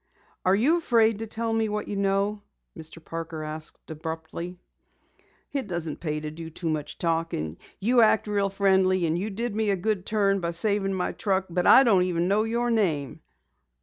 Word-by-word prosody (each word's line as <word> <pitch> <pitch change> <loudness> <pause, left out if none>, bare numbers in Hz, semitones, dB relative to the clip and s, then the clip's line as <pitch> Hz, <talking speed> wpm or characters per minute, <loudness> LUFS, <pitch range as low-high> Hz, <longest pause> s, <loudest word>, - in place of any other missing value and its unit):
"Are 185 +1 +5
you 280 +11 +3
afraid 225 -8 +3
to 225 - -4
tell 225 +1 -2
what 210 0 -3
you 205 - -4
know?" 200 +1 0 0.3
Mr. 160 0 -11
Parker 165 -1 -5
asked 155 +1 -8
abruptly. 160 +3 -6 1.0
"It 275 -6 -2
doesn't 170 -4 -4
pay 150 -2 -2
to 150 0 -5
do 165 +1 -8
too 165 +1 -4
much 150 -1 -3
talking. 165 - -2 0.2
You 240 +5 +4
act 220 -1 +4
real 200 -1 0
friendly 190 -2 +2
and 160 0 0
you 195 +5 -2
did 225 +2 -3
me 220 -1 +1
a 200 - +3
good 195 0 -2
turn 200 -2 +2
saving 195 +2 +1
my 180 - -1
truck 190 -2 -1
but 180 +1 +1
I 265 - +9
don't 205 -7 +4
even 175 -1 0
know 200 +3 +3
your 235 +1 0
name." 165 - 0
190 Hz, 180 wpm, -26 LUFS, 165-210 Hz, 1.0 s, I